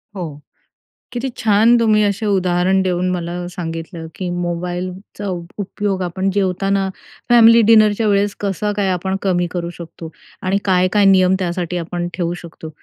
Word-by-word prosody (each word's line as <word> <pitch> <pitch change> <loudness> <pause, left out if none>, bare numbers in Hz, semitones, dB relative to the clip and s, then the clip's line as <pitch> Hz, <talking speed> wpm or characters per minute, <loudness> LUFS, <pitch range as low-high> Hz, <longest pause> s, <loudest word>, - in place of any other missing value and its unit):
हो. 160 -6 -6 0.7
किती 250 +2 -3
छान 220 +2 +4
तुम्ही 215 -2 +3
असे 205 +1 -1
उदाहरण 185 -1 +2
देऊन 185 -1 0
मला 175 0 -4
सांगितलं, 165 -1 -6
की 185 -2 -4
मोबाईलचा 180 +3 -4
उपयोग 190 +2 -4
आपण 185 +2 -1
जेवताना 195 0 0 0.4
फॅमिली 230 -1 +7
डिनरच्या 215 -1 +5
वेळेस 200 0 +1
कसं 205 +1 -1
काय 200 -2 +1
आपण 190 +1 -2
कमी 175 -2 +1
करू 170 -1 -3
शकतो 165 -1 -9 0.3
आणि 190 +2 +1
काय, 185 -1 +3
काय 205 +2 +2
नियम 190 -1 +5
त्यासाठी 180 -1 -2
आपण 175 +1 -3
ठेवू 175 -1 -2
शकतो. 165 -1 -10
185 Hz, 145 wpm, -18 LUFS, 175-200 Hz, 0.7 s, फॅमिली